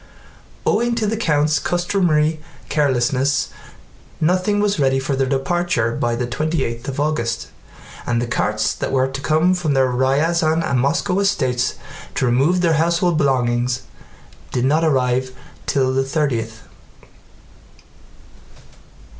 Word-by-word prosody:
Owing 235 +2 +1
to 225 -2 -1
the 215 +2 0
count's 150 -7 +1
customary 170 -4 +1 0.3
carelessness 135 -1 +1 0.7
nothing 185 +5 +1
was 205 -4 +1
ready 135 -1 +2
for 135 +1 -1
their 135 -1 0
departure 135 -3 0
by 120 0 0
the 120 +1 -2
twenty 155 +4 -1
eighth 115 +1 -5
of 135 0 -4
August 120 -6 -1 0.6
and 120 -1 +1
the 120 - -1
carts 110 -2 0
that - - -4
were 130 -1 +2
to 135 0 -6
come 155 +5 +2
from 165 -6 -1
their 130 -1 +3
Ryazán 155 +6 +1
and 130 - +1
Moscow 170 +8 +1
estates 130 -11 0 0.4
to - - +1
remove 140 +9 +2
their 170 -2 +3
household 170 0 +1
belongings 125 -3 +1 0.7
did 125 0 0
not 155 +4 +2
arrive 130 -3 +1 0.3
till 130 -1 +1
the 135 0 +1
thirtieth. 120 -6 -2
140 Hz, 130 wpm, -20 LUFS, 125-165 Hz, 0.7 s, their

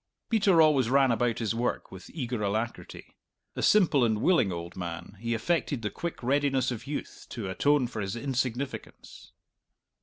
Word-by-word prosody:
Peter 200 -6 +4
always 140 -6 +3
ran 135 -1 +4
about 115 0 +1
his 115 -2 -1
work 120 +2 -2
with 95 -1 -11
eager 125 -7 -4
alacrity. 110 +3 -4 0.4
A - - -3
simple 170 -10 +4
and 110 -2 +1
willing 145 - +3
old 85 0 -6
man, 85 +1 -6
he 115 +1 -1
affected 140 0 -1
the 105 - -2
quick 170 -6 -6
readiness 135 -1 +1
of 120 +2 -6
youth 145 - -6
to 110 -5 -5
atone 140 +8 +2
for 115 -3 -5
his 95 +1 -3
insignificance. 130 0 -4
120 Hz, 160 wpm, -28 LUFS, 110-140 Hz, 0.4 s, Peter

